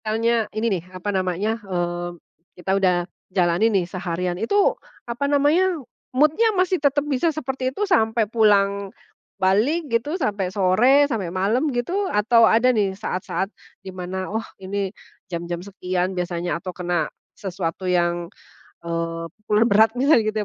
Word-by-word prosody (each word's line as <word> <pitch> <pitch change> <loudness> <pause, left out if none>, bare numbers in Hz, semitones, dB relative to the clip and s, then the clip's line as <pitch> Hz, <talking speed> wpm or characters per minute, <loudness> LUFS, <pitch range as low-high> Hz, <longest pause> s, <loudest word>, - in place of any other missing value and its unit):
Misalnya 225 0 +1
ini 215 -5 0
nih, - - -22
apa 205 +3 -3
namanya 190 +4 -1
eee, 175 -3 -2 0.5
kita 180 +2 -1
udah 190 -2 +3 0.3
jalani 180 +3 +2
nih 195 -5 +1
seharian 180 0 -3
itu 400 - +3 0.3
apa 245 +4 -2
namanya, 315 +6 +3 0.3
mood-nya 305 - +3
masih 365 -2 +2
tetap 285 0 +2
bisa 295 +3 +1
seperti 265 -4 -2
itu 405 +11 -2
sampai 225 - +2
pulang 200 -2 +2 0.5
balik 215 - +2
gitu, 290 +9 0
sampai 205 - -1
sore, 215 +9 +4
sampai 225 -10 -2
malam 205 - +1
gitu, 350 +11 -1
atau 225 +2 +4
ada 250 +3 +4
nih 200 -4 0
saat-saat 190 -1 -3 0.3
di 190 - -7
mana, 185 +1 -4
oh 220 0 -1
ini 195 +1 -3 0.4
jam-jam 170 0 -4
sekian 185 -1 -3
biasanya, 175 -1 -2
atau 185 +1 -6
kena 175 -3 -1 0.3
sesuatu 185 -2 -4
yang, 175 -1 +1 0.6
eee, 165 0 -3 0.3
pul 210 - +3
berat 220 +2 +4
misalnya 270 -1 +5
gitu 215 - -4
205 Hz, 145 wpm, -22 LUFS, 180-250 Hz, 0.6 s, misalnya